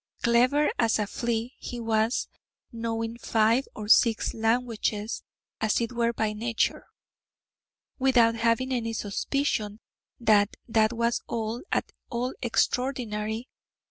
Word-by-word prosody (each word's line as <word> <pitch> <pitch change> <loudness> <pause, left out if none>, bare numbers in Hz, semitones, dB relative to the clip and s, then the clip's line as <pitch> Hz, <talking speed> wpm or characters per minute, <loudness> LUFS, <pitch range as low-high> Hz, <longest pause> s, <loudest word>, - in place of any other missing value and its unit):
Clever 250 +5 +4
as 230 -2 +3
a 210 - 0
flea 235 +3 -2
he 245 - -6
was, 225 +1 +1 0.4
knowing 230 0 -3
five 225 +4 +2
or 210 -1 -6
six 225 +1 +4
languages, 225 -2 -1 0.4
as 220 -1 +1
it 235 0 -2
were 235 -1 +1
by 220 -2 -1
nature, 230 +1 -1 1.1
without 245 -3 +4
having 230 +3 +1
any 230 -2 -1
suspicion 215 0 -1 0.4
that 210 -3 +3
that 220 -1 +3
was 235 0 0 0.5
at - - 0 0.2
all 245 +2 -2
extraordinary. 235 -2 -1
230 Hz, 110 wpm, -27 LUFS, 220-240 Hz, 1.1 s, Clever